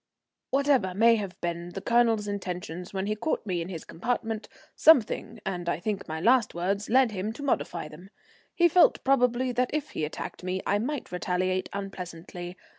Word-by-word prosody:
Whatever 270 -9 +2
may 230 +2 +5
have 195 -3 -5
been 175 0 -3
the - - -4
Colonel's 230 -1 +2
intentions 180 -3 -5
when 190 -1 -2
he 210 +1 -1
caught 230 +5 -2
me 180 -4 -1
in 165 - -5
his 165 -4 -6
compartment, 225 +3 -3 0.3
something, 235 -6 +4
and 175 -3 -2
I - - -1
think 200 +2 -3
my 160 0 -4
last 235 +3 +3
words, 195 +4 -1
led 255 0 +4
him 205 +1 -3
to 285 - -8
modify 175 - -1
them. 165 +6 -13 0.5
He 345 -1 +5
felt, 350 +1 +4
probably, 250 -1 +2
that 250 +1 +1
if 300 0 -2
he - - -3
attacked 150 +4 -5
me 185 +1 -2
I 205 - +2
might 280 +5 -3
retaliate 185 +1 -1
unpleasantly. 180 -2 -7
200 Hz, 180 wpm, -27 LUFS, 180-240 Hz, 0.5 s, may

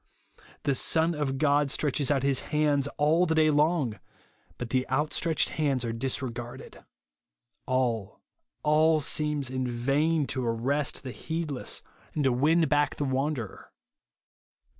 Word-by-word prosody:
The 140 - +2
.Son 160 +5 +2
of 145 -3 -2
God 145 0 +2
stretches 145 0 0
out 140 -3 +1
his 140 -2 +2
hands 150 -2 +2
all 160 +5 +3
the 160 - +1
day 155 -1 +4
long, 150 -6 +1 0.6
but 120 -2 -6
the 130 0 0
outstretched 150 +4 +1
hands 140 -5 0
are 115 - -2
disregarded. 120 0 -4 0.8
All, 120 -6 -1 0.4
all 155 +1 +4
seems 150 -2 0
in 130 -1 -2
vain 140 +6 +1
to 130 -1 -3
arrest 125 +5 -1
the 130 - -5
heedless, 160 -2 -3 0.3
and 150 - 0
to 135 - +3
win 160 +6 +3
back 145 0 +1
the 145 - -2
wanderer. 135 -4 -3
140 Hz, 135 wpm, -28 LUFS, 130-155 Hz, 0.8 s, day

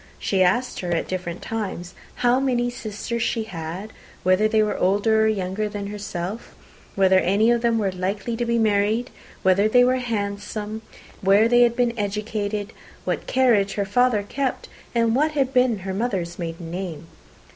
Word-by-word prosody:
She 190 -2 0
asked 245 +8 +2
her 175 -1 -3
at 165 - -1
different 180 -2 -4
times 190 -5 -4 0.3
how 245 +2 +4
many 245 -2 0
sisters 230 +1 -5
she 230 -1 0
had, 185 +2 -7 0.3
whether 185 +4 +4
they 215 0 +3
were 210 - -1
older 205 +4 +2
or - - +4
younger 210 0 -1
than 205 -1 -5
herself, 205 0 -6 0.4
whether 190 -1 +5
any 205 +6 +3
of 235 -1 +2
them 235 -1 +2
were 200 -3 0
likely 195 +5 -3
to 240 - -1
be 235 0 +1
married, 215 +2 +1 0.3
whether 190 +3 +4
they 245 +2 +6
were 255 +1 +3
handsome, 210 -2 -4 0.4
where 200 +3 +5
they 240 +1 +4
had 235 -1 +4
been 240 -1 +1
educated, 210 0 -3 0.3
what - - -2
carriage 230 -7 +3
her 200 - -1
father 230 +1 +2
kept, 265 +5 -3 0.3
and 230 -1 +2
what 305 +3 +2
had 270 -3 0
been 250 -3 +3
her 190 - -2
mother's 190 -6 -2
maiden 165 -1 -5
name? 175 -4 -5
210 Hz, 170 wpm, -23 LUFS, 190-235 Hz, 0.4 s, they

